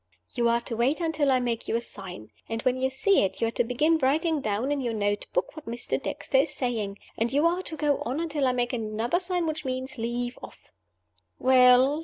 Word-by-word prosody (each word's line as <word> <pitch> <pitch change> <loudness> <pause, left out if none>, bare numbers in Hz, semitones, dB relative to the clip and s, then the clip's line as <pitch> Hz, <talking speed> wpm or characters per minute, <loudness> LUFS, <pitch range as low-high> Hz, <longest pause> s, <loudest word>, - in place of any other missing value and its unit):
"You 235 -1 +2
are 235 0 +2
to 235 - -4
wait 250 +8 +1
until 320 -4 +1
I 260 -1 +4
make 235 -2 -2
you - - 0
a - - +2
sign; 185 - -7 0.2
and 225 0 -3
when 255 0 +1
you 265 - +2
see 380 +10 +3
it 190 - -1
you - - +2
are - - -6
to 240 - +1
begin 300 +7 +2
writing 305 +3 +1
down 220 +4 -1
in 290 -1 0
your 235 -3 -2
note 205 -1 -1
book 180 - -1
what 310 -2 -10
Mr. 235 +1 -2
Dexter 265 - 0
is 285 - +2
saying 220 -6 -2 0.2
and 230 +1 +1
you 290 +4 +2
are 345 +2 +2
to 320 -4 -6
go 295 -2 +1
on 260 +6 -3
until 300 -5 0
I - - +3
make 245 0 -1
another 225 +6 -1
sign, 360 -2 -1
which 315 -1 -3
means, 260 -1 -4
Leave 240 +2 -3
off!" - - -13 0.7
"Well?" 255 +2 +5
255 Hz, 230 wpm, -27 LUFS, 235-295 Hz, 0.7 s, Well